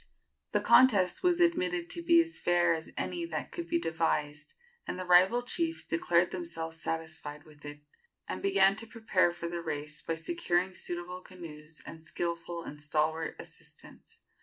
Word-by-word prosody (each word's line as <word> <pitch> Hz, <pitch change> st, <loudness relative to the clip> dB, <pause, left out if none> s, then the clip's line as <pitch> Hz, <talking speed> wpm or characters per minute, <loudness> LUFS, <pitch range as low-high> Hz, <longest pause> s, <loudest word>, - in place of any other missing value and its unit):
The -, -, +2 dB
contest 220 Hz, -, +5 dB
was 355 Hz, -1 st, +3 dB
admitted 180 Hz, -, +2 dB
to 340 Hz, -, -3 dB
be 335 Hz, 0 st, +5 dB
as 330 Hz, 0 st, -8 dB
fair 175 Hz, -1 st, +3 dB
as 160 Hz, 0 st, -5 dB
any 345 Hz, -, -2 dB
that 335 Hz, -, -4 dB
could 345 Hz, -1 st, -5 dB
be 340 Hz, -, +1 dB
devised, 150 Hz, -, -1 dB, 0.3 s
and -, -, -3 dB
the 185 Hz, -, -4 dB
rival 185 Hz, +7 st, +5 dB
chiefs 330 Hz, +6 st, -1 dB
declared 170 Hz, +1 st, +2 dB
themselves 165 Hz, -2 st, -5 dB
satisfied 155 Hz, -2 st, -4 dB
with 150 Hz, -2 st, -18 dB
it, 145 Hz, 0 st, -8 dB, 0.5 s
and -, -, -4 dB
began 390 Hz, -, +4 dB
to 225 Hz, +1 st, -5 dB
prepare 220 Hz, -6 st, +2 dB
for 170 Hz, 0 st, -5 dB
the 170 Hz, 0 st, -4 dB
race 150 Hz, -1 st, -4 dB
by 165 Hz, -, -2 dB
securing 185 Hz, -, 0 dB
suitable 180 Hz, +1 st, -5 dB
canoes 160 Hz, -4 st, -10 dB
and 160 Hz, -, -9 dB
skilful 170 Hz, 0 st, -4 dB
and 150 Hz, -2 st, -8 dB
stalwart 155 Hz, +2 st, 0 dB
assistants. -, -, -13 dB
175 Hz, 160 wpm, -31 LUFS, 160-220 Hz, 0.5 s, contest